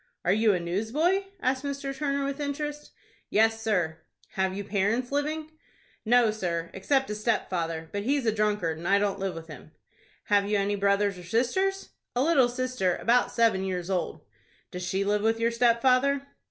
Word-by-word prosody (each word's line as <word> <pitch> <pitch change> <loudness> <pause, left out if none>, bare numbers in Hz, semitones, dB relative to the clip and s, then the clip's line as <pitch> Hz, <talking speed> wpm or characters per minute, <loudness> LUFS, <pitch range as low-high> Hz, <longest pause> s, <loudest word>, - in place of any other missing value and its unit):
"Are 180 - +4
you 220 +1 +4
a - - -1
newsboy?" 235 - 0 0.2
asked 260 +1 0
Mr. 280 -1 -4
Turner, 280 -1 -1
with 280 +1 -3
interest. 295 +1 -4 0.4
"Yes, 225 +1 +3
sir." 180 -8 0 0.3
"Have 190 0 -1
you 205 - -3
parents 210 +6 0
living?" 305 +2 -2 0.5
"No, 235 -1 +4
sir, 170 -5 -3
except 265 +5 0
a - - -1
stepfather; 175 -7 -2
but 205 - -2
he's 270 +4 0
a 220 - +3
drunkard, 210 -7 0
and 170 - -5
I 200 - +5
don't 200 -1 0
live 190 -1 -2
with 165 -1 -8
him." 155 0 -12 0.5
"Have 205 -1 +2
you 210 - +2
any 200 +1 0
brothers 200 -1 +1
or - - -10
sisters?" 260 - 0 0.3
"A 250 - +2
little 275 -6 +4
sister, 245 -7 -1
about 245 +2 +2
seven 225 -5 +2
years 185 -1 -3
old." 185 -2 -2 0.5
"Does 180 - -6
she 190 +2 -1
live 205 +1 +1
with 225 +1 +1
your 230 +1 +2
stepfather?" 255 +4 +3
220 Hz, 180 wpm, -27 LUFS, 190-265 Hz, 0.5 s, I